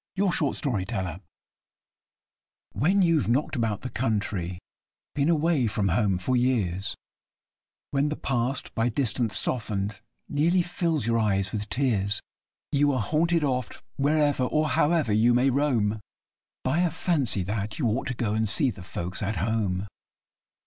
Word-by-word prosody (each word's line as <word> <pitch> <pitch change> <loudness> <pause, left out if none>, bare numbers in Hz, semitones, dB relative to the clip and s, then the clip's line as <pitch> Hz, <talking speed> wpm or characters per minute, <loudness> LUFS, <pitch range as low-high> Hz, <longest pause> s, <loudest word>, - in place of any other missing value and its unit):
THE 195 - +1
PROFESSIONAL 150 -7 0
WANDERER 95 -4 -3 1.5
When 180 - +3
you've 165 -8 +2
knocked 135 +5 +1
about 115 -5 -1
the 130 - -5
country 100 -7 -1 0.6
been 145 +2 +1
away 160 -5 +2
from 100 -2 0
home 95 0 +2
for 130 +8 -1
years; 105 -6 0 1.0
When 140 +1 +1
the 150 - -2
past, 125 0 -2
by 115 +1 +1
distance 120 -4 0
softened, 105 -4 -2 0.3
nearly 170 +5 +2
fills 165 -6 -1
your 115 0 +2
eyes 100 -3 +1
with 105 -1 -4
tears 105 -6 +1 0.5
You 145 0 +3
are 130 - 0
haunted 165 +7 +1
oft, 130 -5 -2
wherever 145 -2 +2
or 155 +3 +1
however 150 -3 +2
you 115 +3 +4
may 130 +2 +3
roam, 120 -6 +1 0.6
By 135 +6 +1
a 180 -1 +3
fancy 145 - 0
that 105 +2 -3
you 145 - -1
ought 115 +5 -1
to 130 - -2
go 110 -3 -1
and 110 -1 0
see 135 +3 +3
the 95 - -11
folks 90 0 -5
at 105 +1 -1
home. 100 -1 -1
120 Hz, 150 wpm, -26 LUFS, 105-145 Hz, 1.5 s, you